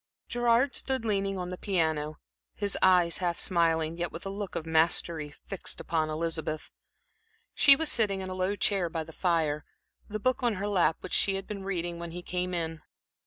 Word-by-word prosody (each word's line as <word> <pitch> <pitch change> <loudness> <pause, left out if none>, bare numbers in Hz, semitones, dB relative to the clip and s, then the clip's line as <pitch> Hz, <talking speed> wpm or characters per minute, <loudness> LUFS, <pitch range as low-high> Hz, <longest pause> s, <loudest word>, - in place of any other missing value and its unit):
Gerard 240 +2 +2
stood 265 -4 0
leaning 195 -2 -1
on 180 -1 -4
the 180 - -7
piano, 160 -6 -1 0.4
his 200 -1 0
eyes 180 -2 +4
half 175 -2 -1
smiling, 165 -2 +2
yet 175 -1 -3
with 165 - -8
a - - -3
look 200 -1 -6
of 160 - -3
mastery, 160 -1 +2
fixed 185 +5 -7
upon 160 -2 -1
Elizabeth. 155 -1 -3 0.8
She 280 -2 +9
was 320 +2 0
sitting 205 -4 +2
in 190 - -5
a 185 - -5
low 185 +2 -1
chair 195 -3 +2
by 160 -1 -3
the 160 +1 -13
fire, 160 -5 0 0.5
the 215 - -3
book 255 +4 0
on 240 -3 +1
her 200 +2 -3
lap 180 -5 +2
which - - -7
she 195 - +4
had 195 0 -3
been 200 -2 -6
reading 175 -3 -3
when 170 0 -5
he 175 +2 -7
came 180 0 -2
in. 165 -2 -3
180 Hz, 195 wpm, -28 LUFS, 165-200 Hz, 0.8 s, She